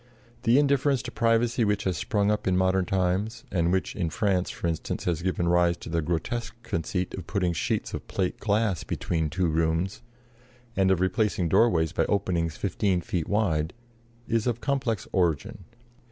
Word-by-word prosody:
The 120 +3 +4
indifference 140 -2 +2
to 120 - -6
privacy 115 +1 +2
which 105 -1 +1
has 95 -2 0
sprung 105 +2 +1
up 105 - -1
in 90 -1 +3
modern 95 0 +2
times, 95 +5 0
and 85 -2 +1
which 95 0 0
in 85 -4 -1
France, 95 +1 0
for - - -6
instance, 80 -2 -2
has 85 -2 -1
given 90 -1 0
rise 85 0 +3
to - - -9
the 85 0 0
grotesque 90 +10 -2
conceit 90 -3 -2
of 95 - -7
putting 90 -2 0
sheets 80 - -2
of - - -6
plate 95 -2 -2
glass 105 -4 +1
between 80 -2 -2
two 90 +5 0
rooms, 80 +3 0 0.7
and 95 -1 +3
of 95 -2 +2
replacing 95 -1 +1
doorways 80 -7 +3
by - - +1
openings 85 -5 0
fifteen 95 -1 0
feet 85 -1 -3
wide, 90 -6 +1 0.5
is 115 0 0
of 120 -1 0
complex 130 -8 -1
origin. 85 0 0
95 Hz, 170 wpm, -27 LUFS, 85-110 Hz, 0.7 s, The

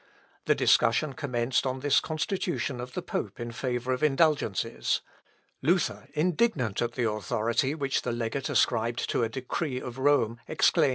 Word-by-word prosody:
The - - +4
discussion 135 +5 +3
commenced 125 -1 0
on 130 0 -3
this 145 0 +4
constitution 155 -4 -2
of 125 0 -8
the - - -4
pope 100 -2 -4
in 120 0 -4
favour 125 +1 -2
of 125 - -3
indulgences. 135 - +1 0.6
Luther, 170 +4 +1
indignant 155 - +1
at 120 0 -1
the 120 -2 0
authority 110 +5 0
which 140 -3 0
the - - -2
legate 120 +3 -2
ascribed 115 0 +1
to - - +1
a 115 - +1
decree 130 +2 -3
of 125 0 -7
Rome, 130 -5 +2
exclaimed: 155 0 +3
Luth. - - +2
130 Hz, 160 wpm, -28 LUFS, 120-145 Hz, 0.6 s, The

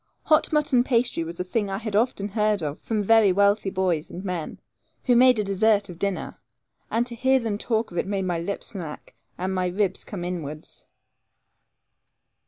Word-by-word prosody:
Hot 310 0 +3
mutton 295 -5 +3
pasty 240 -8 +1
was 165 +1 -8
a - - 0
thing 205 +2 -1
I 195 - -2
had 215 -1 -4
often 210 -2 +1
heard 210 -3 +1
of 145 0 -4
from 215 -2 -2
very 220 -1 +5
wealthy 200 +1 +3
boys 180 -5 -1
and 185 +3 -8
men, 180 -4 -4 0.4
who 245 - +3
made 250 0 +6
a 210 - +1
dessert 200 +1 +2
of 175 -1 -10
dinner; 200 -1 -3 0.5
and 235 +1 +1
to 245 - -7
hear 260 +3 +3
them 220 -4 -3
talk 225 -2 -1
of 175 - -2
it - - -2
made 195 -1 -1
my 175 -2 -1
lips 185 +4 -4
smack, 165 -7 -8 0.2
and 185 +1 -2
my 185 -1 0
ribs 190 +2 0
come 190 -5 -6
inwards. 155 -4 -6
200 Hz, 190 wpm, -25 LUFS, 180-225 Hz, 0.5 s, made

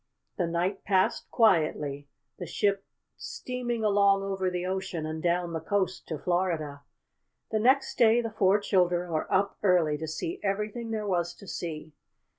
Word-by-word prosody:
The 175 - +1
night 175 +4 -1
passed 190 -2 +1
quietly, 155 -9 +2 0.3
the 175 - -5
ship 200 +3 0 0.3
steaming 240 -2 -4
along 200 -1 +4
over 190 -1 -1
the 180 0 -3
ocean, 185 -3 -3
and 155 0 -4
down 175 0 0
the 160 - -1
coast 190 +2 -1
to 160 - -3
Florida. 165 -5 -1 0.7
The 215 - +1
next 265 +4 +2
day 230 0 +6
the 230 -2 -2
four 200 -1 +3
children 180 -3 +1
were 155 -1 -2
up 195 +1 +1
early 170 -6 +3
to 160 - -4
see 340 - -4
everything 210 +3 -2
there 215 -1 -2
was 175 -3 -1
to 200 - -14
see. 155 -3 -5
185 Hz, 160 wpm, -28 LUFS, 170-205 Hz, 0.7 s, day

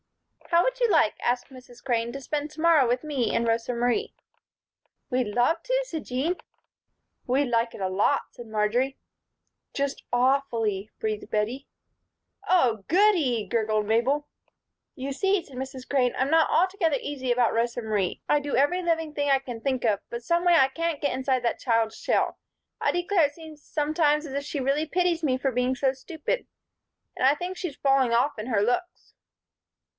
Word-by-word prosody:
"How 340 0 +4
would - - -1
you 480 -2 +3
like," 310 - +4
asked 245 +2 0
Mrs. 250 -2 -14
Crane, 235 -2 -1
"to 275 - -6
spend 290 +3 -3
to 305 - -13
morrow 320 -5 +5
with 245 +3 0
me 275 -6 -1
and 235 - +1
Rosa 230 +1 0
Marie?" 245 - 0 1.0
"We'd 250 -2 +1
love 245 +9 +1
to," - - 0
said 320 -9 -5
Jean. 285 +9 -1 0.9
"We'd 260 +2 +1
like 230 0 +1
it - - -10
a 190 - 0
lot," 185 +2 +2
said 240 - -11
Marjory. 220 +5 0 0.8
"Just 280 0 -2
awfully," 240 -6 +1
breathed 215 -1 -3
Bettie. 225 +6 -2 0.8
"Oh, 245 - +3
goody!" 330 - +3
gurgled 215 0 0
Mabel. 255 +7 +1 0.7
"You 275 +1 -4
see," 390 +5 +1
said 275 - -14
Mrs. 260 0 -6
Crane, 255 -3 +1
"I'm 265 +3 0
not 325 0 +4
altogether 355 -4 +2
easy 260 -3 -3
about 240 -1 +2
Rosa 235 +1 0
Marie. 210 -5 -1
I 295 - +3
do 290 -1 -3
every 290 +7 +2
living 325 -3 -1
thing 285 -1 -1
I 270 -1 +4
can 245 -4 -8
think 260 -2 -1
of, 205 -3 +2
but 235 0 -6
someway 345 +5 +3
I 270 -5 +6
can't 330 +1 -2
get 285 -3 0
inside 260 -1 0
that 235 - 0
child's 225 -2 +1
shell. - - 0 0.4
I - - +2
declare, 350 -2 +2
it 290 - -15
seems 315 -2 -12
sometimes 300 0 +1
as 275 - -7
if 280 0 -2
she 290 - -4
really 275 +4 0
pities 350 0 +1
me 260 -4 +2
for 265 +1 -1
being 250 +1 0
so 265 0 +1
stupid. 320 - -4 0.7
And - - 0
I 275 +2 +5
think 355 +4 -5
she's 355 -7 -5
falling 270 -3 +3
off 245 +4 +2
in 215 - -5
her 220 -5 +1
looks." 350 - -2
270 Hz, 180 wpm, -26 LUFS, 240-315 Hz, 1.0 s, I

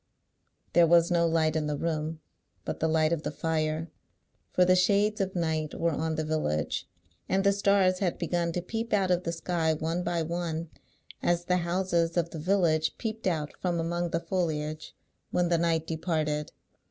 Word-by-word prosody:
There 170 -1 +6
was 170 +1 +5
no 170 -1 +3
light 160 -1 +2
in 155 -1 0
the 150 -1 -1
room 155 0 -2 0.4
but - - -4
the 160 - +1
light 160 0 +2
of 165 - -1
the - - -3
fire; 155 +1 -2 0.6
for 180 - +4
the 185 0 +5
shades 205 +3 +3
of 190 -1 -2
night 160 -3 -1
were 170 0 +2
on 160 +1 -1
the 155 - -1
village, 155 - -1 0.4
and 190 +1 +2
the 200 - +5
stars 195 -2 +3
had 185 -4 0
begun 170 0 -1
to 175 - -2
peep 225 +4 -4
out 195 -3 +2
of 180 0 +1
the 170 - 0
sky 165 -1 0
one 165 +3 -2
by 170 -2 0
one, 165 -1 -3 0.5
as 175 0 +1
the 180 0 +2
houses 170 -1 0
of 170 -1 +1
the 160 - -6
village 160 -3 +1
peeped 220 -2 -3
out 155 -5 -1
from 175 -2 0
among 170 +1 -1
the 165 - 0
foliage 155 -3 -3 0.3
when 175 -1 +1
the 170 -1 +2
night 165 -1 +1
departed. 155 -2 -1
170 Hz, 185 wpm, -28 LUFS, 160-180 Hz, 0.6 s, There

